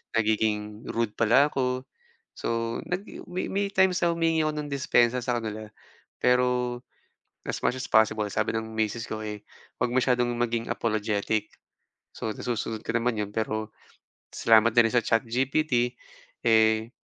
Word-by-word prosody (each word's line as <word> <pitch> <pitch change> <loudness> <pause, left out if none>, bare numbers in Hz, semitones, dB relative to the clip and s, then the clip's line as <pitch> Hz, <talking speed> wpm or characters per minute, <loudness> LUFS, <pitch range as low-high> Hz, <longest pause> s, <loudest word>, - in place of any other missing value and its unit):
nagiging 105 -1 0
rude 115 -2 -1
pala 120 +6 +4
ako. 130 -1 -1 0.5
So, 115 0 -2
nag 180 +2 -2 0.3
may 180 +1 -3
may 200 +1 0
times 190 -1 +3
na 170 - +3
humingi 165 -1 +1
ako 155 - 0
ng 150 -1 -4
dispensa 125 -3 +2
sa 120 -1 0
kanila 110 -1 -5 0.6
pero, 125 0 +2 0.7
as - - -3
much 130 - +1
as 130 - -4
possible 110 -1 +3
sabi 105 +2 0
ng 110 0 -4
misis 110 +1 -1
ko, 110 0 -5
eh, 105 -1 -6 0.4
"Huwag 125 - 0
masyadong 125 -1 +2
maging 120 -1 -1
apologetic." 110 -1 -1 0.7
So 110 - -4
nasusunod 115 -1 -3
ka - - -2
naman 115 -1 0
'yon 105 -1 -3
pero, 110 0 -2 0.6
salamat 115 0 +4
na 120 - +7
rin - - -7
sa 120 - +4
ChatGPT, 125 +2 +1 0.5
eh, 110 0 +4
115 Hz, 150 wpm, -27 LUFS, 110-125 Hz, 0.7 s, na